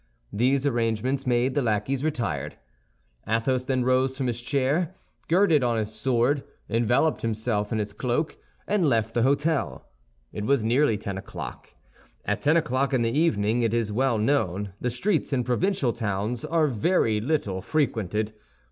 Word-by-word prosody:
These 130 +5 +2
arrangements 120 +1 0
made, 125 +1 +2
the 145 - +1
lackeys 115 +4 0
retired. 85 - -2 0.7
Athos 125 +4 0
then 130 -1 0
arose 130 +1 +2
from 135 - -1
his 120 -1 -2
chair, 140 +8 0 0.3
girded 170 -5 +4
on 120 -2 +1
his 110 0 -2
sword, 130 +3 +1 0.2
enveloped 120 +7 +1
himself 110 -2 -1
in 110 - 0
his 105 -1 -3
cloak, 130 +5 -1 0.3
and 195 -7 +2
left 115 -2 +1
the 120 - +1
hôtel. 140 +4 +1 0.5
It 105 - -4
was 135 -2 +2
nearly 120 -1 +3
ten 100 -2 -5
o'clock. 100 - -8 0.5
At - - -1
ten 155 +3 +4
o'clock 140 -3 +1
in 120 - +2
the 115 - +1
evening, 120 -6 +2
it 115 -1 +1
is 115 -3 0
well 125 0 +2
known, 105 -5 0
the 125 - 0
streets 150 - -1
in 125 -2 +1
provincial 125 - 0
towns 110 +1 -2
are 165 -1 +2
very 115 - +1
little 110 -8 -1
frequented. 110 - -1
125 Hz, 155 wpm, -26 LUFS, 110-140 Hz, 0.7 s, girded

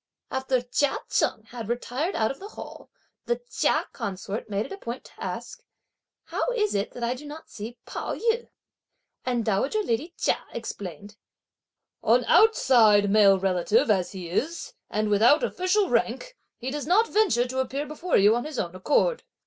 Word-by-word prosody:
After 265 -1 0
Chia 275 +8 +1
Cheng 220 - +1
had 230 -3 -7
retired 250 +8 -2
out 220 -1 +1
of 270 - -9
the 395 - -8
hall, 435 - -10 0.4
the 480 - 0
Chia - - +1
consort 195 +3 -5
made 205 +1 -1
it - - -11
a 395 - -5
point 235 -4 -6
to - - -12
ask: - - -6 0.6
"How - - -2
is 425 -4 +1
it 200 +1 0
that 245 - -6
I 235 +1 +1
do 280 +4 -10
not 305 +2 -10
see 225 +3 -7
Pao - - -4
yü?" 465 +1 0 0.8
and 240 -3 0
dowager 265 - +1
lady 310 - -2
Chia - - 0
explained: 205 -3 -7 0.8
"An - - +3
outside 225 - +5
male 200 -2 +6
relative 190 +3 +2
as 190 -2 0
he 185 -3 -6
is, 300 - -2 0.2
and 215 0 0
without 225 +9 +5
official 370 +2 +1
rank, - - -1 0.2
he 255 +2 -4
does 295 0 -4
not 425 +7 +4
venture 390 - +2
to 260 +1 -3
appear 270 +2 -2
before 310 +4 0
you 205 +3 +5
of 240 - -1
his 305 -3 -6
own 170 -4 -2
accord." 300 - +1
245 Hz, 175 wpm, -26 LUFS, 210-320 Hz, 0.8 s, male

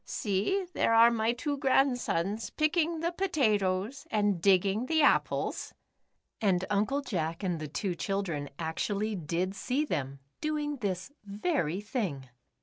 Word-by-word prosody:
See, 215 - -1
there 230 - +2
are 230 +1 +7
my 225 0 +1
two 285 +4 -2
grandsons 245 - +1
picking 315 +1 +1
the 340 +1 0
potatoes 235 - 0
and 205 -5 +1
digging 195 +5 +3
the 315 0 +3
apples," - - +1 0.7
and 190 -3 +2
Uncle 215 +8 +1
Jack 170 - -3
and 175 -4 -1
the 155 - -4
two 175 +6 -2
children 170 -3 -2
actually 205 +6 -2
did 175 +2 -2
see 260 +9 -1
them, 140 - -3 0.2
doing 300 -1 -2
this 195 0 -3
very 200 - -1
thing. 190 - -3
205 Hz, 135 wpm, -30 LUFS, 185-275 Hz, 0.7 s, are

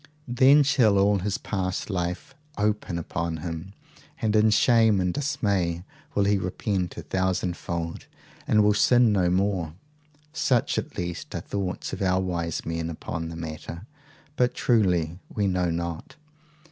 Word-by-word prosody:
Then 135 +4 +6
shall 120 -8 +3
all 100 +1 +3
his 100 +1 -1
past 95 0 -3
life 90 -1 -3 0.2
open 105 -4 -1
upon 85 0 -3
him, 85 +3 -6 0.5
and 110 -2 0
in 110 +1 +5
shame 110 -1 +4
and 90 -1 0
dismay 95 - -1 0.3
will 100 - +3
he 100 0 +2
repent 95 0 -2
a - - -6
thousand 95 -1 -1
fold, 85 -1 -5 0.4
and 105 -1 +4
will 105 0 +4
sin 120 +2 +4
no 95 -4 +2
more. 90 -4 0 0.6
Such, 125 -6 +1
at - - -8
least, 85 -1 -5
are - - -2
thoughts 95 -3 -4
of - - -5
our 95 -1 +2
wise 85 -3 -2
men 80 0 -3
upon 80 0 -5
the 85 - -7
matter; 80 +3 -7 0.5
but 125 -1 +2
truly 90 -7 +1
we 105 - -1
know 90 -2 +1
not. 85 - -4
95 Hz, 150 wpm, -26 LUFS, 85-105 Hz, 0.6 s, Then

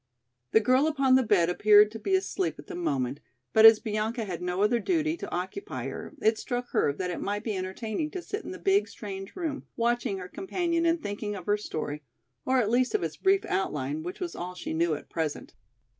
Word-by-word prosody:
The 220 - +5
girl 255 +7 +3
upon 275 -4 +2
the 260 - +6
bed 205 -8 +3
appeared 210 +3 +6
to 225 - -7
be 385 - +1
asleep 375 0 -1
at - - -11
the - - -8
moment, 140 - -1 0.3
but 220 0 +10
as 225 -1 +8
Bianca 220 +1 -2
had 180 -3 -5
no 180 +2 0
other 235 +3 +3
duty 320 0 0
to - - -6
occupy 185 - -4
her - - -8
it 220 0 +3
struck 245 0 -4
her - - +2
that 180 +5 -3
it - - -5
might 205 +1 -2
be 220 -3 -2
entertaining 210 +9 -3
to 360 +2 -6
sit 415 +5 -5
in - - -7
the - - -6
big, 395 +1 +2
strange 195 -2 -8
room 320 -6 -4
watching 235 -4 0
her 180 -1 -7
companion 335 - -1
and 330 -1 +1
thinking 205 0 -4
of 185 -3 -8
her 205 - +3
story, 155 -7 -4 0.5
or 260 0 +3
at 225 -4 +2
least 255 - +2
of 425 - +1
its - - -3
brief 390 0 +2
outline 150 -6 -2
which 175 +3 -6
was 355 -2 -4
all 180 +1 -5
she 180 - -5
knew 165 -1 +1
at - - -10
present. 160 -3 -4
220 Hz, 220 wpm, -28 LUFS, 185-305 Hz, 0.5 s, but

